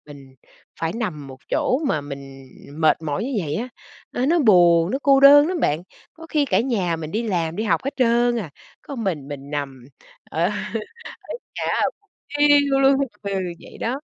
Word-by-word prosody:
mình 140 -3 -13 0.5
phải 165 0 -1
nằm 185 - -4
một 130 -1 -11
chỗ 255 - +1
mà 155 - 0
mình 135 -2 -10 0.2
mệt 155 +1 +2
mỏi 150 +5 -2
như 270 - -4
vậy 145 - -3
á, 235 +9 -3 0.4
nó 250 - -1
nó 340 +4 +3
buồn, 175 - +5
nó 265 - -1
cô 275 -1 +5
đơn 290 +2 +8
lắm 360 -4 -2
bạn, 150 +3 0 0.3
có 325 0 -12
khi 305 -2 +1
cả - - +2
nhà 195 -10 0
mình 160 -1 -6
đi 220 +3 -1
làm 170 -3 -1
đi 215 - -2
học 220 - +1
hết 275 - -4
trơn 240 -1 +2
à, 180 -8 -5 0.3
có 280 - -8
mình 175 - -3
mình 140 -1 -8
nằm, 135 -4 -5 0.5
ờ, 165 - 0
ở 180 - +2 1.1
nhà - - -3
á - - 0 0.2
buồn 410 - -38 0.3
thiu 285 -2 +4
luôn. 270 0 +5 0.3
Ừ, 200 - -3 0.3
vậy - - -13
đó. 255 +4 -2
195 Hz, 195 wpm, -22 LUFS, -, 1.1 s, đơn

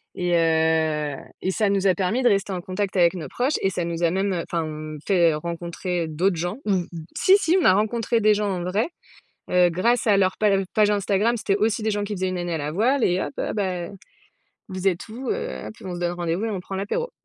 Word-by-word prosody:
et 180 -1 -1
heu, 160 -3 +2 0.3
et 185 - 0
ça 210 +1 +1
nous 195 -1 +2
a 185 - +5
permis 195 +8 0
de 245 - +5
rester 200 -1 +1
en 180 - -3
contact 190 +2 -3
avec 175 -1 +5
nos 165 - -5
proches 260 +4 0
et 195 - +2
ça 175 - -2
nous 170 0 -3
a 165 - +3
même, 195 +1 0
heu 170 - -2
enfin 170 -1 0
mmh, 155 -1 -7
fait 170 -5 +4
rencontrer 170 +2 -3
d'autres 175 +5 +1
gens. 175 +5 -3
Mmh 190 -4 +2
mh. - - -14 0.3
Si, 385 +2 +6
si 350 -1 +2
on - - 0
a 185 - +7
rencontré 225 +3 +1
des 215 0 +5
gens 205 -1 -1
en 180 -2 -3
vrai, 195 - 0 0.6
heu, 180 -1 +4
grâce 230 +9 +1
à 205 - +5
leur 185 -1 +2
page 200 -2 +3
page 210 -1 +4
Instagram, 205 +3 +1
c'étaient 200 -2 0
aussi 220 +1 0
des 220 - 0
gens 205 0 -1
qui 210 - -5
faisaient 185 0 -1
1 185 0 -3
année 175 -1 -2
à 160 - -1
la 145 +1 -3
voile 240 - +2
et 180 +1 +2
hop: - - -3
«Heu, - - -2
bah, 185 -4 -2 0.8
vous 185 0 -2
êtes 175 -2 0
où 250 +4 -6
heu?» 475 +3 -4
hop, - - -8
on 185 -2 -5
se 175 - -6
donne 175 0 -1
rendez-vous 175 +3 -2
et 225 - -1
on 190 -3 -3
prend 195 - -7
l'apéro. 205 - -2
185 Hz, 250 wpm, -23 LUFS, 175-210 Hz, 0.8 s, a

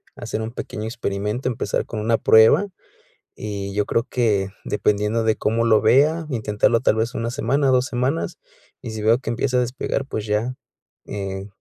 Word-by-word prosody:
hacer 110 - -4
un 110 +1 -4
pequeño 110 -2 -6
experimento, 110 +1 -3
empezar 110 -4 -2
con 110 - -5
una 115 +1 +2
prueba, 110 - +6 0.7
y 100 -2 -4
yo 105 0 +1
creo 115 - 0
que 105 -6 +1 0.2
dependiendo 105 +2 0
de 110 -1 +2
cómo 115 +2 0
lo 110 -2 +4
vea, 155 +5 +3
intentarlo 110 0 +1
tal 110 - +3
vez 115 +3 -1
1 115 0 -2
semana, 140 +1 0
2 130 -1 +3
semanas, 130 +5 -2 0.4
y 125 - -7
si 110 -1 -5
veo 115 +4 +4
que 125 - -6
empieza 125 +2 0
a - - +4
despegar, 130 +2 -2
pues 105 - -4
ya, 110 +4 -1 0.5
eh, 95 -1 -5
115 Hz, 175 wpm, -22 LUFS, 105-125 Hz, 0.7 s, prueba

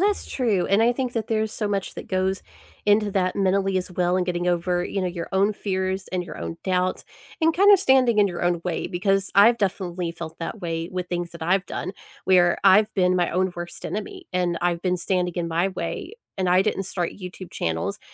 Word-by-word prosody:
that's 405 +1 +1
true, 215 -9 0
and 200 +3 +3
I 235 +1 +4
think 255 -1 -2
that 225 -2 -2
there's 220 -1 -1
so 210 -2 -2
much 195 -2 -2
that - - -8
goes 190 +1 0 0.4
into 205 0 +4
that 185 -2 0
mentally 195 0 +1
as 185 0 -2
well, 180 0 +1
and 185 - +1
getting 175 0 -1
over, 175 0 +1
you 190 +1 -2
know, - - 0
your 175 -1 -4
own 200 +2 +2
fears 190 -1 -2
and 180 -1 -2
your - - -9
own 85 0 -5
doubts, 185 0 0 0.4
and 325 +1 +4
kinda 400 +3 +7
standing 260 - +3
in 205 - +6
your 175 -3 -4
own 175 -1 +1
way. 175 -2 -2
Because 195 +2 0
I've 230 +4 +6
definitely 185 -3 -2
felt 165 -1 -8
that 175 +6 -5
way 165 0 -3
with 180 -1 -4
things 175 -1 -3
that 170 - -9
I've 185 +3 +1
done, 185 - -4 0.3
where 175 -2 +4
I've 210 +3 +6
been 185 -2 +3
my 175 -1 +2
own 185 +1 0
worst 175 0 -7
enemy, 365 - -5
and 175 -2 0
I've 175 -1 +1
been 180 0 0
standing 180 0 -1
in 175 -2 -2
my 170 +3 +1
way. 195 - -5 0.2
And 185 -1 +1
I 185 +2 +5
didn't 195 - -1
start 175 -2 -2
YouTube 185 -1 -9
channels 80 0 -2
185 Hz, 220 wpm, -24 LUFS, 175-200 Hz, 0.4 s, kinda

